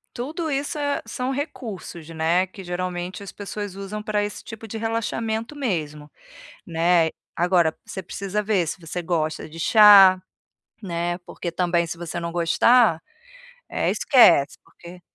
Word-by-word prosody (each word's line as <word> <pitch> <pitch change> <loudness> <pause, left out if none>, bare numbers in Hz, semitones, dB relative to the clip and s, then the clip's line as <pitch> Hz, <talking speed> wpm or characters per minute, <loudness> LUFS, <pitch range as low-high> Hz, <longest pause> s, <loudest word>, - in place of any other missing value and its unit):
Tudo 310 +6 -4
isso 280 +2 -2
é 285 -1 -1
são 255 0 -3
recursos, 230 - -6
né, 165 +3 +1
que 190 0 -12
geralmente 180 +2 -4
as 195 - -8
pessoas 205 -1 -6
usam 200 +2 -6
pra 210 -1 0
esse 205 - -6
tipo 225 -1 -9
de 225 - -6
relaxamento 225 +2 -3
mesmo, 155 - -3 0.5
né. 165 0 +2 0.3
Agora, 175 -2 +2
você 190 - -6
precisa 195 +3 -3
ver 205 -4 +1
se 165 - -4
você 165 +2 -5
gosta 160 -2 -2
de 165 +2 -11
chá, 200 -1 +8 0.6
né, 175 -2 -2
porque, 170 - -6
também, 170 -1 +1
se 165 +1 -6
você 175 0 -6
não 170 0 -4
gostar, 175 +3 +3 0.7
eh, - - 0
esquece, 175 - +4
porque 175 +1 -14
185 Hz, 145 wpm, -23 LUFS, 170-220 Hz, 0.7 s, chá